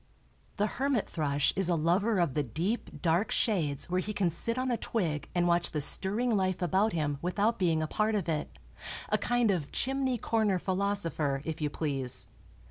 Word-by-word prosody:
The 205 - +2 0.2
hermit 275 -6 +1
thrush 145 -3 0
is 190 -2 +2
a 175 - +3
lover 185 +7 +2
of 170 -7 +1
the 150 - +1
deep, 165 - -3
dark 170 +5 +2
shades 155 - 0
where 180 +1 0
he 210 +3 -4
can 190 -4 +1
sit 230 +8 0
on 255 0 0
a - - +2
twig 165 -13 -2
and 175 0 +2
watch 175 0 +2
the 150 - -2
stirring 210 - +3
life 185 -2 0
about 190 +5 +1
him 145 -4 -1
without 205 +6 0
being 165 -4 +2
a - - -2
part 215 +5 0
of 195 -5 -1
it—a 155 -2 -4
kind 245 -3 +2
of 165 -7 -2
chimney 265 -1 0
corner 220 -4 +1
philosopher, 180 -7 -1
if 160 -1 -4
you 150 - 0
please. 130 - -2
180 Hz, 185 wpm, -30 LUFS, 155-215 Hz, 0.2 s, a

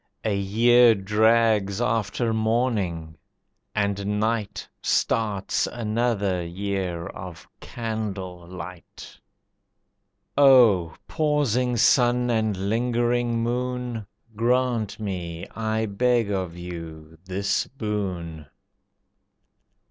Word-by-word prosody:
A 105 -2 +1
year 115 +4 +5
drags 105 0 +2
after 115 0 0
morning, 110 -9 -1 0.6
and 100 0 -1
night 110 -1 -2
Starts 105 -4 0
another 110 -5 -1
year 90 -1 -3
of 90 -2 -9
candle 100 -6 -5
light. 90 -1 -10 1.2
O 120 - +5
Pausing 135 -6 +1
Sun 125 0 +3
and 110 -3 0
Lingering 120 +1 +1
Moon! 125 -2 -3 0.3
Grant 120 -2 0
me, 90 -5 -4
I 110 0 -2
beg 115 +1 +1
of 90 -3 -3
you, 80 -2 -9
this 100 +2 -1
boon. 95 - -4
105 Hz, 80 wpm, -24 LUFS, 95-120 Hz, 1.2 s, year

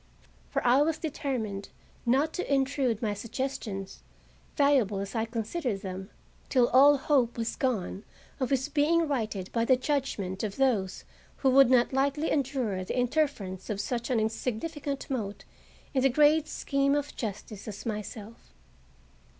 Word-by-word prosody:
For - - -2
I 250 +3 +5
was 310 +1 +1
determined 255 -11 -3 0.4
not 275 +6 +3
to 360 - -3
intrude 270 -4 +1
my 210 -2 +1
suggestions, 210 -3 -5 0.6
valuable 275 -9 +3
as 195 0 -4
I 225 -1 0
considered 230 - -3
them, 190 +1 -6 0.4
till 250 -3 +4
all 280 +3 +7
hope 260 -4 +1
was 230 0 -2
gone 215 -6 -1 0.4
of 260 -3 0
his 265 0 +1
being 310 +3 +2
righted 215 -9 -2
by 230 - +1
the 255 +2 +4
judgment 255 -9 -2
of 205 -2 -3
those 225 -9 +1 0.4
who 265 - +6
would 270 -1 +7
not 250 0 +4
lightly 280 +3 +1
endure 255 -9 0
the 185 - -4
interference 245 - -1
of 205 -2 -2
such 235 +3 -2
an 245 -3 +2
insignificant 265 +6 -3
mote 215 -7 -4 0.5
in 265 - +2
the 270 - +4
great 300 +3 +4
scheme 275 0 +1
of 290 0 -2
justice 210 -2 -6
as 205 -2 -7
myself. 210 - -7
250 Hz, 150 wpm, -29 LUFS, 210-280 Hz, 0.6 s, all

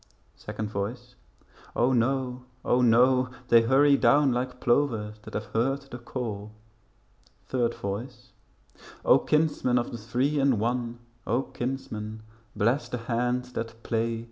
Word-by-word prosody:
Second 105 -1 -6
Voice 120 +5 -4 0.6
O 125 +2 +3
no, 125 +1 0 0.2
O 125 - +3
no, 125 +2 +4 0.2
they 115 -1 +7
hurry 135 +4 +5
down 145 -1 +4
Like 125 +1 -2
plovers 115 -5 +1
that - - -10
have 105 - -2
heard 135 +5 +1
the 120 - -6
call. 110 -4 -5 1.0
Third 120 -2 0
Voice 100 +6 -6 0.7
O, - - +6
kinsmen 150 -5 +1
of 120 - -1
the 120 - -6
Three 125 +7 0
in 135 -3 +3
One, 120 +2 -1 0.3
O, 120 +5 +1
kinsmen 110 -5 -5 0.3
bless 120 +8 +1
the 125 - -3
hands 125 +2 -1
that 115 -1 -5
play. 115 0 -1
120 Hz, 135 wpm, -27 LUFS, 115-130 Hz, 1.0 s, they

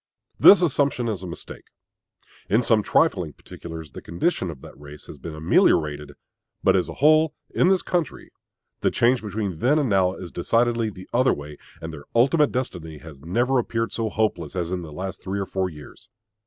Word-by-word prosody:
This 195 -2 +8
assumption 140 -6 +1
is 105 -5 -3
a 95 - -6
mistake. 85 - -9 0.8
In 110 +5 +3
some 110 -2 +3
trifling - - +1
particulars 80 -3 -10
the - - -9
condition 90 - -1
of 80 -5 -8
that - - -12
race 75 0 -12
has - - -11
been 80 -2 -7
ameliorated; 75 -1 +2 0.5
but - - +4
as - - 0
a - - -7
whole, 155 +2 +4 0.2
in - - +2
this 190 -1 +3
country, 175 -6 -3 0.5
the - - +2
change 120 +1 +2
between 100 -5 -4
then 135 - +3
and 145 -5 +1
now 95 -2 +2
is 90 - -9
decidedly 115 +4 +1
the 95 -2 -11
other 130 +2 +3
way; 75 0 -9 0.2
and 80 0 -6
their 70 -2 -10
ultimate 140 +5 +4
destiny 85 -11 -4
has 75 -2 -13
never 120 - +1
appeared 115 -1 -2
so 115 -1 -2
hopeless 100 -8 -1
as 90 -1 -2
in 90 -1 -2
the 80 -3 -9
last 95 +4 -6
three 100 +1 -3
or 100 - -2
four 95 -1 -2
years. 75 -3 -13
95 Hz, 190 wpm, -23 LUFS, 80-125 Hz, 0.8 s, This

